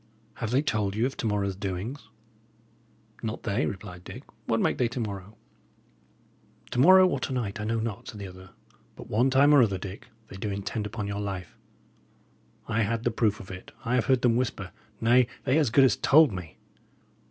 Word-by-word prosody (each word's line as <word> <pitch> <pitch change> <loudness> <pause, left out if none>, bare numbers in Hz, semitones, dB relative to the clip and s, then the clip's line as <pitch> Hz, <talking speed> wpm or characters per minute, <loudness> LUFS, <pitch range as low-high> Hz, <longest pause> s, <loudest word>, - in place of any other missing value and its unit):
Have 115 - -3
they 130 +5 +2
told 105 -8 -1
you 110 +3 +1
of 135 - -2
to 115 - -2
morrow's 100 -2 -1
doings?" 100 +7 -5 1.1
"Not 110 0 -4
they," 100 -2 0
replied 90 -2 -7
Dick. - - -9 0.2
"What - - +1
make - - +1
they 125 - +3
to 120 +2 -5
morrow?" 100 -2 -5 1.3
"To - - -1
morrow, 185 +6 +8
or 140 -7 -1
to 130 - -4
night, 115 -5 -3
I - - -3
know 115 +1 0
not," 115 +1 -4
said 110 - -8
the 100 - -6
other, 95 0 -12 0.5
"but - - -11
one 120 +5 +3
time 140 +3 +5
or 145 - +7
other, 100 -5 +2
Dick, 100 +5 -8 0.2
they 95 - -10
do 105 +2 -3
intend 100 +2 -3
upon 105 0 -5
your 100 0 -3
life. 95 -4 -5 1.1
I 115 0 0
had 115 +2 -1
the 120 - +1
proof 110 -2 +1
of 95 - -10
it; 90 0 -10
I 115 - 0
have 125 - +2
heard 130 -2 +2
them 120 -2 +4
whisper; 105 -7 -2 0.3
nay, 120 +2 +4 0.2
they 140 +3 +3
as 145 -6 +2
good 135 +4 +5
as 130 - +4
told 155 -2 +5
me." 90 -6 -8
110 Hz, 200 wpm, -27 LUFS, 100-125 Hz, 1.3 s, morrow